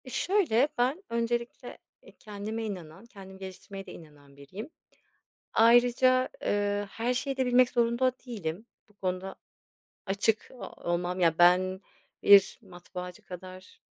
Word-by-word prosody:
E, - - -9
şöyle 290 - +2
ben 260 +10 0
öncelikle, 235 +1 -3 0.3
eee, - - -16
kendime 215 +1 -5
inanan, 180 -2 -8
kendimi 190 -4 -13
geliştirmeye 195 +1 -9
de 180 - -10
inanan 145 -3 -16
biriyim. 185 - -9 0.8
Ayrıca, 245 +3 +4 0.2
ııı, 205 0 0
her 235 +4 -1
şeyi 275 +2 -2
de 260 -1 0
bilmek 250 0 +4
zorunda 235 +2 +2
değilim, 205 -3 -5 0.2
bu 210 - -26
konuda 185 -1 -4 0.7
açık 200 +2 0
o 255 - -9 0.2
olmam, 175 +1 -1
ya, 165 -2 +3
ben 185 +2 +4 0.4
bir 200 -1 +6
matbaacı 180 -1 -9
kadar 185 +1 -11
205 Hz, 130 wpm, -28 LUFS, 185-240 Hz, 0.8 s, bir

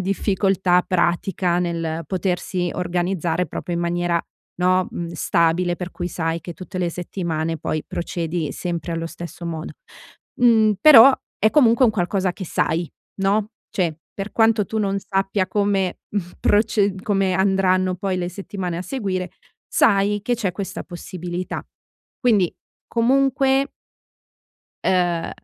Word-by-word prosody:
difficoltà 190 -1 +2
pratica 175 0 +1
nel 165 -2 -2
potersi 180 -1 -1
organizzare 175 -1 -1
proprio 175 - -5
in - - -1
maniera, 170 0 0 0.4
no, 185 0 +3
mhmm, 170 - -4
stabile, 170 +1 +1
per 180 -1 -5
cui 175 -1 -4
sai 165 -1 -2
che 175 +2 -7
tutte 185 0 -7
le 175 - 0
settimane 165 -2 -3
poi 155 - -3
procedi 170 -2 -3
sempre 170 -1 -4
allo 165 0 -2
stesso 170 0 -8
modo, 160 -1 -5 0.7
mhmm, 220 -3 +5
però 270 -2 +9 0.3
è 215 - +3
comunque 250 -3 +5
un 225 - +5
qualcosa 185 -1 0
che 190 - -7
sai, 165 +1 -1 0.3
no, 205 +2 +1 0.2
cioè 170 -5 -1 0.2
per 195 +1 -5
quanto 225 -2 +3
tu 220 - -3
non 200 -1 0
sappia 195 0 -1
come 200 -3 0 0.4
proce 205 -1 +2
come 195 -3 +1
andranno 185 -1 +2
poi 190 0 -2
le 175 -1 -2
settimane 185 -2 -5
a - - -3
seguire, 190 -7 -3 0.4
sai 205 0 +3
che 245 +2 +1
c'è 200 -6 -2
questa 190 0 -5
possibilità. 175 0 -5 0.6
Quindi, 210 -9 +3 0.4
comunque 270 +3 +2 1.1
Ehm, 175 -2 +1
185 Hz, 130 wpm, -22 LUFS, 175-200 Hz, 1.1 s, però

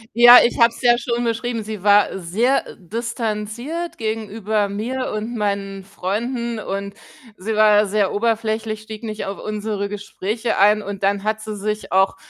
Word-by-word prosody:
Ja, 240 +1 +10
ich 240 - -1
habe 235 0 +7
es - - -13
ja 240 -1 +6
schon 235 0 -2
beschrieben, 230 -1 -2
sie 215 -2 -6
war 205 -1 +4
sehr 220 +10 0
distanziert 230 - -4
gegenüber 215 -2 -2
mir 245 +6 -3
und 220 +3 -4
meinen 200 -2 -2
Freunden 230 +5 -3
und 200 -1 -4 0.4
sie 215 +4 -3
war 210 -1 +5
sehr 200 -1 +1
oberflächlich, 220 0 -1
stieg 220 0 -9
nicht 220 -2 -5
auf 195 0 -5
unsere 210 -1 -3
Gespräche 210 +2 -3
ein 210 +1 +4
und 200 -1 -6
dann 200 0 +1
hat 215 0 -1
sie 215 -1 -6
sich 210 0 -4
auch 190 +1 +3
215 Hz, 160 wpm, -21 LUFS, 200-230 Hz, 0.4 s, Ja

